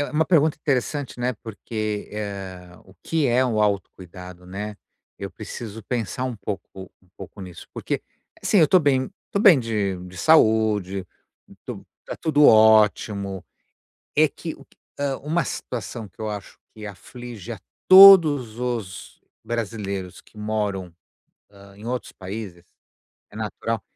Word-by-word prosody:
é - - -4
uma 155 +1 +2
pergunta 155 -3 +3
interessante, 135 -1 -2
né. 125 +1 0
Porque, 110 -1 -5
eh, 95 -4 -6
o 95 - -19
que 160 -4 0
é 125 +2 +3
o 110 -4 0
autocuidado, 90 -3 -3
né? 105 +2 -6 0.4
Eu 100 -1 -6
preciso 110 +2 -8
pensar 120 0 -3
um 125 -3 -3
pouco 100 -1 -6 0.3
um 90 - -28
pouco 100 - -11
nisso, 90 -2 -10
porque - - -3 0.4
assim, 205 - +3
eu 160 - +6
tô 185 - +6
bem, 135 -4 +1 0.2
tô 200 - -1
bem 190 -8 +7
de 105 -5 -1
de 90 0 -12
saúde, 110 - +3 0.6
tô - - -8 0.2
tá - - -6
tudo 150 -2 +3
ótimo. 105 -3 +4 0.7
É 155 +1 +5
que 160 +2 -7
o - - -17
que, - - -30 0.2
hã, 140 -2 -1
uma 160 +4 0
situação 115 -2 -5
que 95 - -29
eu 110 - -3
acho 105 -1 -7 0.2
que 110 -1 -9
aflige 120 +2 -9
a 110 - -7 0.3
todos 160 - +8
os 115 -7 -5 0.2
brasileiros 100 -5 -4
que 110 - -22
moram 105 -4 -3 0.8
em 105 +3 -12
outros 125 +1 -4
países, 95 -2 -8 0.7
é - - -15
natural, 110 0 -3
110 Hz, 145 wpm, -23 LUFS, 100-130 Hz, 0.8 s, todos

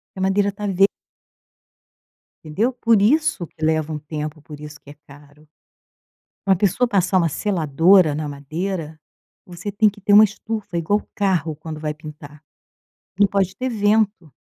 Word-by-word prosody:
Que - - -8
a - - -1
madeira 200 +1 +1
tá 210 - -4
ver 195 +1 +6 1.6
Entendeu? 195 +11 -1
Por 230 -4 +2
isso 275 - +2
que 155 - -12
leva 155 0 0
um 150 - -4
tempo, 150 +1 -6
por 150 0 -11
isso 150 0 -10
que 145 - -14
é - - -12
caro. 145 +1 -18 1.0
Uma 190 -1 +4
pessoa 205 +6 +1
passar 190 -2 +2
uma 170 -2 +2
seladora 165 0 +3
na 150 0 -4
madeira, 155 +3 -5 0.5
você 180 +3 -7
tem 210 +2 +3
que 205 +1 -17
ter 205 +1 0
uma 210 +1 +9
estufa 215 -2 -5
igual 205 +6 +1
o - - -23
carro 180 -6 0
quando 155 0 -8
vai 150 -1 -2
pintar. 150 -1 -12 0.8
Não 205 - +6
pode 195 -1 -1
ter 260 +1 -3
vento. 205 - 0
180 Hz, 165 wpm, -21 LUFS, 155-205 Hz, 1.6 s, uma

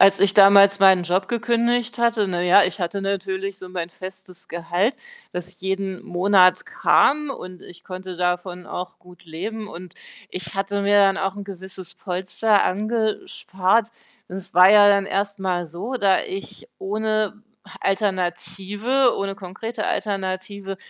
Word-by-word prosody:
Als 195 0 +6
ich 200 -1 +4
damals 200 0 +7
meinen 190 -2 +6
Job 180 +2 0
gekündigt 240 0 0
hatte, 235 -4 +1
na 175 -1 -2
ja, 180 +3 +5
ich 190 +2 -2
hatte 180 +3 -3
natürlich 195 0 -3
so 185 - -10
mein 180 -2 -5
festes 185 0 -11
Gehalt, 175 +7 -1 0.4
das 180 0 -7
jeden 190 0 -3
Monat 185 0 +3
kam, 300 0 +2
und 185 -8 -9
ich 175 - -14
konnte 185 -1 -8
davon 180 0 -2
auch 180 0 -7
gut 180 0 -18
leben 205 +7 -6
und 180 -1 -11 0.4
ich 170 -2 -7
hatte 200 +1 -2
mir 205 +1 +4
dann 195 -1 +4
auch 195 -1 -2
'n 205 - -6
gewisses 190 -2 -10
Polster 190 +3 0
angespart. 215 -1 -1 0.4
Das 190 +1 -9
war 180 +2 +8
ja 205 -1 +7
dann 200 -1 +3
erst 200 0 -2
mal 180 -2 -1
so, 180 +11 -6
da 195 -5 +3
ich 195 +1 -8
ohne 215 +1 -2 0.4
Alternative 200 +6 0
ohne 195 0 -3
konkrete 195 +5 -6
Alternative 195 0 -4
195 Hz, 145 wpm, -22 LUFS, 185-205 Hz, 0.4 s, war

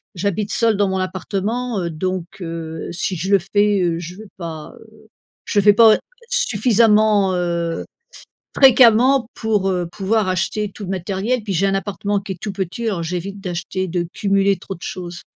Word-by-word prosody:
j'habite 200 +3 -2
seul 225 -2 +2
dans 205 -1 +2
mon 190 0 -1
appartement, 200 +4 -2
heu, 170 - -2
donc 185 +2 -3 0.2
heu, 165 -1 -5
si 185 +1 -2
je 180 +4 -3
le 200 - +7
fais, 205 +2 +1
heu, 170 -1 0
je 175 +1 -8
veux 215 0 -12
pas, 160 -3 -7
heu, 220 0 -19 0.4
je 205 - +1
fais 205 +1 +6
pas 220 0 +6 0.3
suffisamment, 215 - +3
heu, 170 -1 -2 0.7
fréquemment 255 -1 +6
pour, 210 -3 0
heu, 180 -2 -1
pouvoir 210 +1 0
acheter 195 +3 -1
tout 210 - -9
le 185 - -6
matériel 195 +6 -2
puis 205 -2 -4
j'ai 195 +4 +2
un 195 - 0
appartement 200 +1 -2
qui 195 -1 -6
est - - -13
tout 210 - -3
petit 195 +4 -4
alors 190 -6 -1
j'évite 180 +4 -4
d'acheter, 185 0 -4
de 175 0 -2
cumuler 195 -1 +2
trop 195 +1 -7
de 170 - -19
choses. 175 -2 -6
195 Hz, 180 wpm, -20 LUFS, 180-215 Hz, 0.7 s, le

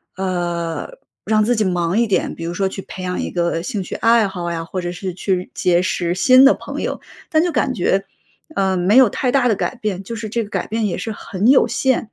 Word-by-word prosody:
呃， 175 - -2 0.4
让 215 -1 +3
自 240 +2 +2
己 215 - +1
忙 175 -1 0
一 235 - +4
点， 200 - -1
比 165 - -8
如 170 - -3
说 195 +1 0
去 195 0 -7
培 185 - -8
养 180 0 -3
一 - - -3
个 170 -1 -1
兴 205 0 -3
趣 - - -6
爱 230 -2 +3
好 175 -3 -4
呀， 165 -1 -3
或 175 +3 -5
者 175 -1 -3
是 185 +1 -5
去 185 -1 -2
结 175 -1 +2
识 175 -2 -1
新 255 +7 +6
的 275 - +7
朋 - - -7
友， - - -3 0.3
但 315 0 +3
就 355 - 0
感 265 - 0
觉， 195 0 +1 0.5
呃， 190 -1 +1
没 185 +6 +3
有 260 -2 +8
太 250 +3 -1
大 260 -2 +3
的 225 - +3
改 255 - -2
变， 210 -5 -3
就 230 +4 -6
是 220 -1 -5
这 230 +1 -1
个 205 - -10
改 - - -2
变 225 0 -1
也 180 - -3
是 225 - -4
很 205 0 -2
有 265 +2 +6
限。 260 -4 0
195 Hz, 260 characters per minute, -19 LUFS, 180-230 Hz, 0.5 s, 有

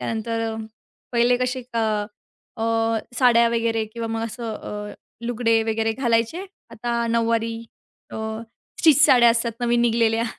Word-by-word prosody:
त्यानंतर 225 0 -3
अ, - - -5 0.6
पहिले 240 +1 +3
कसे 255 0 -2
क - - -1 0.8
अ, - - -1 0.6
साड्या 235 -2 +5
वगैरे 230 -1 0
किंवा 230 -1 -4
मग 225 0 -3
असं 230 -1 -5
अ, 210 0 -7 0.3
लुगडे 230 -1 +1
वगैरे 225 0 0
घालायचे. 235 - 0 0.3
आता 235 +1 -2
नऊवारी 230 0 +1 0.6
अ, - - -7 0.6
स्टिच 305 -2 +6
साड्या 240 -2 +6
असतात 230 0 0
नवीन 240 0 +2
निघालेल्या 230 -1 +2
230 Hz, 135 wpm, -23 LUFS, 225-240 Hz, 0.8 s, स्टिच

